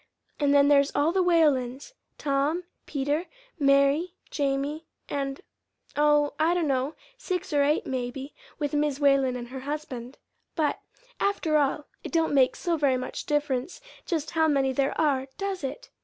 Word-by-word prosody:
And 285 -1 +3
then 285 0 +6
there's 280 -1 +4
all 300 +3 +3
the 375 +1 +2
Whalens: 295 - +2 0.2
Tom, 290 +4 0 0.2
Peter, 290 +4 -1 0.3
Mary, 280 +5 +3 0.2
Jamie, 285 +2 -1 0.2
and 275 -1 -3 0.5
oh, 295 0 +3
I 330 +3 +3
dunno, 285 -3 0 0.2
six 365 -9 -3
or 290 - +4
eight, 295 +2 +1
maybe, 260 +2 -4 0.2
with 290 -2 -2
Mis' 295 -2 +1
Whalen 275 -3 +3
and 240 -1 -6
her 265 +1 -6
husband. 275 -3 -6 0.4
But, 310 -3 0 0.4
after 340 -6 +1
all, 290 +1 0 0.2
it - - -6
don't 325 -3 +1
make 265 -2 +4
so 345 -2 -1
very 280 -4 +2
much 255 - -5
diff'rence 295 0 -1 0.3
just 320 -3 -2
how 320 -1 +3
many 270 -3 +2
there 275 +1 0
are; 275 -4 +2
does 390 -4 -3
it?" - - -6
290 Hz, 155 wpm, -27 LUFS, 275-315 Hz, 0.5 s, then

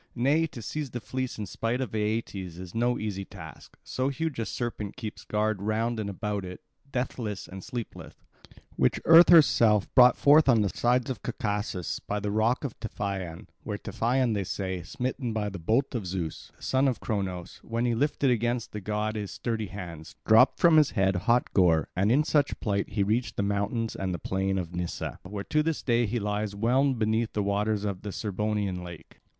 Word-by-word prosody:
Nay, 145 +7 +2
to 120 -6 -9
seize 150 +5 -4
the 120 - -5
fleece 130 +3 -4
in 105 - -4
spite 115 +6 -2
of 130 -5 -3
Aeetes 105 -5 -2
is 90 -1 -9
no 120 +2 +1
easy 100 -2 -3
task; - - -12
so 130 +1 -1
huge 150 -1 -3
a 115 - -2
serpent 115 -4 -4
keeps 110 -4 -7
guard 105 -1 -1
round 110 +2 -1
and 105 -2 -2
about 100 0 -3
it, 90 0 -8 0.3
deathless 120 -5 -3
and 95 0 -9
sleepless, 120 -3 -7 0.6
which - - +2
Earth 165 +2 +8
herself 115 - +5
brought 125 -1 +7
forth 145 0 +6
on 115 -4 +5
the 100 - +1
sides 125 +5 +1
of 130 - -6
Caucasus, 105 -5 -3
by 105 - -3
the 100 0 -2
rock 110 +6 +1
of 140 - -5
Typhaon, 95 -4 -4 0.2
where 105 -2 -4
Typhaon, 120 +3 0
they 100 -2 -1
say, 95 -1 -3
smitten 125 - -3
by 105 -2 -1
the 95 -2 -7
bolt 115 - +1
of 110 -7 -3
Zeus, 85 -3 -4
son 130 +1 +1
of 130 - 0
Cronos, 95 -5 -4
when 115 +1 -2
he 120 - +2
lifted 140 +2 +1
against 120 0 0
the 105 - -6
god 105 +2 -2
his 105 -2 -4
sturdy 110 -3 -3
hands, 85 -4 -8
dropped 110 +4 +5
from 170 -2 +6
his 150 -2 +5
head 95 -1 +3
hot 115 +7 +1
gore; 85 -4 +3
and 100 +4 +2
in 140 +5 +4
such 145 -2 +1
plight 100 -2 -1
he 100 - 0
reached 110 +5 -1
the 100 - +1
mountains 100 +3 -1
and 95 -3 -3
plain 95 0 0
of 90 -3 -3
Nysa, 90 -1 -4
where 100 +1 -6
to 150 - +1
this 160 0 -1
day 120 -2 +2
he 120 +3 -1
lies 105 0 -2
whelmed 130 +5 +2
beneath 110 +1 0
the 105 - 0
waters 105 +1 0
of 100 -2 -3
the 105 - -5
Serbonian 105 -2 -2
lake." 85 -2 -11
110 Hz, 195 wpm, -28 LUFS, 100-120 Hz, 0.6 s, Earth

